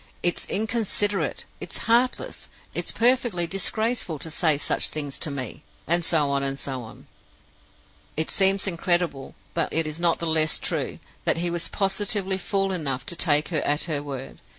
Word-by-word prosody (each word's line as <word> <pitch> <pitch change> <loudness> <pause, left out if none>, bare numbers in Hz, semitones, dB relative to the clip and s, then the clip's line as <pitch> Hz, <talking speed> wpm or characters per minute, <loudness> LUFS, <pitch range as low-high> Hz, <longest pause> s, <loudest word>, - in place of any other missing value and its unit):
It's 175 - +1
inconsiderate, 205 -2 +1
it's - - -5
heartless, 240 +2 +1 0.2
it's - - -1
perfectly 235 -7 +2
disgraceful 195 0 0
to 160 +3 -5
say 155 -2 +3
such - - +1
things 145 -3 -3
to - - +1
me!' 140 0 -5 0.2
and 170 +1 +2
so 155 -4 +2
on, 140 0 +1
and 135 0 -1
so 135 -2 -3
on. 110 -1 -12 1.1
It 160 - 0
seems 195 0 +4
incredible, 175 -6 0 0.2
but 165 -2 -1
it 165 0 +2
is 155 +1 -5
not 170 -1 +3
the 170 - -4
less 160 -1 +3
true, - - -2 0.3
that - - +3
he 175 +1 0
was 170 0 -1
positively 195 -1 0
fool 195 +1 0
enough 140 -8 -2
to 170 - -1
take 150 -3 +3
her 160 -4 0
at 145 +1 +1
her 155 -4 -1
word. 135 -2 -7
170 Hz, 170 wpm, -25 LUFS, 150-195 Hz, 1.1 s, seems